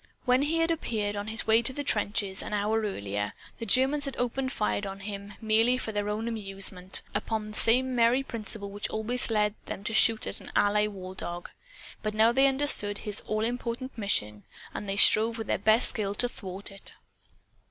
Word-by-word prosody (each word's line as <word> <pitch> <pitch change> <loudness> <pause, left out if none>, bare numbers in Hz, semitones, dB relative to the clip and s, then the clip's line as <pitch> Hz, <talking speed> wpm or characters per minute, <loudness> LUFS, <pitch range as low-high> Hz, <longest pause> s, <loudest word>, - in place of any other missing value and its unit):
When 250 +1 +3
he 305 +3 0
had 330 0 +2
appeared, 215 -10 -2
on 205 +1 -4
his 220 0 -2
way 225 +1 +4
to 235 - +1
the 285 +2 -5
trenches, 205 -4 0
an - - -6
hour 210 +2 0
earlier, 105 - -3 0.3
the 230 - -5
Germans 270 +7 +2
had 275 - -5
opened 260 +2 -1
fire 210 -5 0
on 195 0 -7
him, 200 0 -7
merely 225 +3 +3
for 230 - -4
their 205 -1 -2
own 215 +2 -3
amusement 195 -4 -1
upon 215 +1 -3
the - - -10
same 255 +3 +4
merry 240 +3 +3
principle 215 -4 -6
which 205 +1 -4
always 235 +4 +1
led 210 -2 +1
them 195 - -6
to 220 - -4
shoot 225 0 +4
at - - -6
an - - -10
Ally 210 +1 +3
war 190 -3 -8
dog. 175 -2 -6 0.5
But 215 0 -3
now 220 +2 +5
they 270 +3 +4
understood 265 -7 +2
his 210 0 -2
all 215 +1 0
important 245 +2 -4
mission; 105 - -1 0.3
and 205 - -6
they 195 - -2
strove 225 +2 +5
with 225 - -4
their - - -1
best 220 +3 +6
skill 205 -2 -1
to 245 - 0
thwart 195 -4 -8
it. 195 - -8
215 Hz, 200 wpm, -28 LUFS, 205-240 Hz, 0.5 s, best